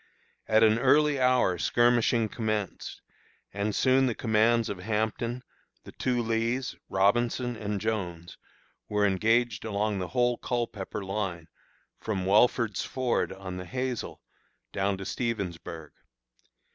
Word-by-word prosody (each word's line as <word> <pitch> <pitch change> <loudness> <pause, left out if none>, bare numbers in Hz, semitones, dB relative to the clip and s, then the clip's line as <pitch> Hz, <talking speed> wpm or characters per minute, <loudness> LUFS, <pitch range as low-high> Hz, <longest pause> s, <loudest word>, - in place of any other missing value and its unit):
At 110 +1 +4
an 110 +1 +4
early 145 +2 +4
hour 125 -9 +3
skirmishing 120 0 +3
commenced, 110 -3 -4 0.5
and 100 +1 -2
soon 130 0 +3
the 120 - -1
commands 115 +1 +2
of 100 - -5
Hampton, 110 +4 -2 0.4
the - - -11
two 125 -2 -1
Lees, 115 +3 -1
Robinson, 120 +5 +1
and 105 -2 -3
Jones, 90 -6 -3 0.5
were 105 -1 +2
engaged 110 +2 +1
along 105 -1 -1
the 90 - -3
whole 120 -1 +1
Culpepper 105 -4 -3
line, 95 -4 -3 0.5
from 100 -4 -3
Welford's 110 +1 +3
Ford, 130 -2 -1
on 95 -1 -7
the 90 - -6
Hazel, 125 +5 -4 0.5
down 95 0 0
to 95 - -7
Stevensburg. 90 - -4
110 Hz, 120 wpm, -28 LUFS, 100-120 Hz, 0.5 s, At